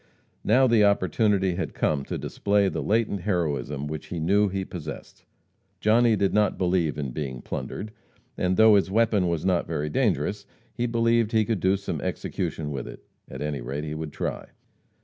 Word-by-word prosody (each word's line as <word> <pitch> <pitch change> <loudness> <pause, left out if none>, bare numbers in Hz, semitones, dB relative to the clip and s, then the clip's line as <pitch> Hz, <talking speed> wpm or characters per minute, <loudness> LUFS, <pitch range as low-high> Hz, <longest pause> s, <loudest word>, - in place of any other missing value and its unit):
Now 125 +5 +4
the 115 -4 +4
opportunity 100 -1 +2
had - - -4
come 70 -3 0
to - - -4
display 100 0 +1
the - - -3
latent 110 -3 0
heroism 75 -7 -1
which 75 0 -6
he 85 - -4
knew 100 +5 +3
he 95 0 -3
possessed. 80 -4 -8 0.5
Johnny 115 +1 +4
did 100 -2 +1
not 105 -2 +2
believe 90 -5 +1
in 70 -3 -3
being 65 -2 -4
plundered, 105 +1 -5 0.4
and, 90 0 0
though 110 0 +7
his 100 -2 +3
weapon 110 -3 +2
was 85 -1 -1
not 90 -2 +1
very 75 -2 -2
dangerous, 100 +9 0 0.3
he 120 0 -1
believed 115 -1 +2
he 110 -1 +3
could 110 -2 -1
do 95 +3 +2
some 100 - -4
execution 75 -2 -3
with 70 - -4
it; - - -10 0.3
at 65 +2 -6
any 75 -3 -3
rate, 70 +5 -4
he 75 0 -4
could 80 -1 -5
try. - - -4
95 Hz, 180 wpm, -25 LUFS, 75-105 Hz, 0.5 s, though